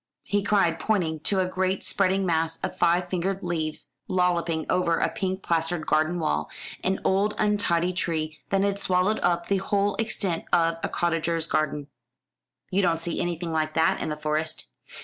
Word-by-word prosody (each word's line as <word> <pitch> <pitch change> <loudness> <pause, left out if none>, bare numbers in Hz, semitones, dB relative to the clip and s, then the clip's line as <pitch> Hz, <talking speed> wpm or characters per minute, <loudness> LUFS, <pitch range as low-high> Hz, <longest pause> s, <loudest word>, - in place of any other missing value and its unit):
he 205 0 0
cried, 195 -5 +2
pointing 165 -5 0
to 190 +5 0
a - - +1
great 185 +1 -1
spreading 195 0 +1
mass 165 -2 +1
of - - -2
five 175 +1 +2
fingered 190 +2 -2
leaves 160 -3 -2 0.2
lolloping 175 -3 +1
over 175 -2 +2
a - - +1
pink 190 0 -3
plastered 165 -1 0
garden 155 +3 +2
wall 75 - -1 0.3
an 190 +1 0
old 200 +2 +2
untidy 185 -4 +1
tree 155 -3 -2
that 195 0 +2
had 200 0 0
swallowed 185 +3 +1
up 175 -1 +1
the 200 - +2
whole 200 +1 +1
extent 205 -6 -1
of 165 -1 +3
a - - -2
cottager's 165 -1 0
garden. 155 -1 -1 0.9
"You 190 +2 +3
don't 170 -3 +2
see 170 0 -3
anything 170 -1 -2
like 155 -1 -1
that 160 0 +3
in - - -2
the 150 - -3
Forest." 155 +1 -2
175 Hz, 170 wpm, -26 LUFS, 160-190 Hz, 0.9 s, of